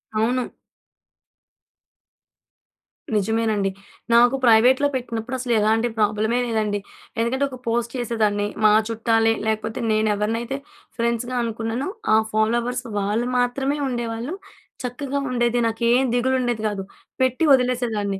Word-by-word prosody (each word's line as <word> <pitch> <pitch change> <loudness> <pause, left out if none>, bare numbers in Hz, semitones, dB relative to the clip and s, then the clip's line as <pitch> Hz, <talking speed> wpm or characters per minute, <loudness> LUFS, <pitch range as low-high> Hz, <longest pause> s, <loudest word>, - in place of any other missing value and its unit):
అవును. 245 +3 +1 2.7
నిజమేనండి. 215 -1 +1 0.4
నాకు 240 +3 +6
ప్రైవేట్‌లో 250 +5 +5
పెట్టినప్పుడు 240 0 -4
అసలు 245 -1 -1
ఎలాంటి 220 +3 +2
ప్రాబ్లమే 215 +3 +1
లేదండి. 215 -3 -1 0.4
ఎందుకంటే 255 +4 0
ఒక 255 - -8
పోస్ట్ 235 0 0
చేసేదాన్ని. 215 -4 0 0.2
మా 215 - +7 0.2
చుట్టాలే, 225 0 +2
లేకపోతే 220 0 -2
నేను 215 0 +2
ఎవరినైతే 230 +5 -2 0.4
ఫ్రెండ్స్‌గా 235 +2 -1
అనుకున్నానో, 230 +4 -3 0.3
ఆ - - +7 0.2
ఫాలోవర్స్ 235 +3 0 0.2
వాళ్ళు 210 +5 0
మాత్రమే 270 +4 0
ఉండేవాళ్ళు. 240 +3 -3 0.5
చక్కగా 275 +3 -3
ఉండేది, 240 -1 +1
నాకేం 235 +3 +2
దిగులు 260 +2 +1
ఉండేది 240 -3 -1
కాదు, 200 -2 -3 0.4
పెట్టి 260 +4 +1
వదిలేసేదాన్ని. 235 -6 0
235 Hz, 110 wpm, -22 LUFS, 220-250 Hz, 2.7 s, మా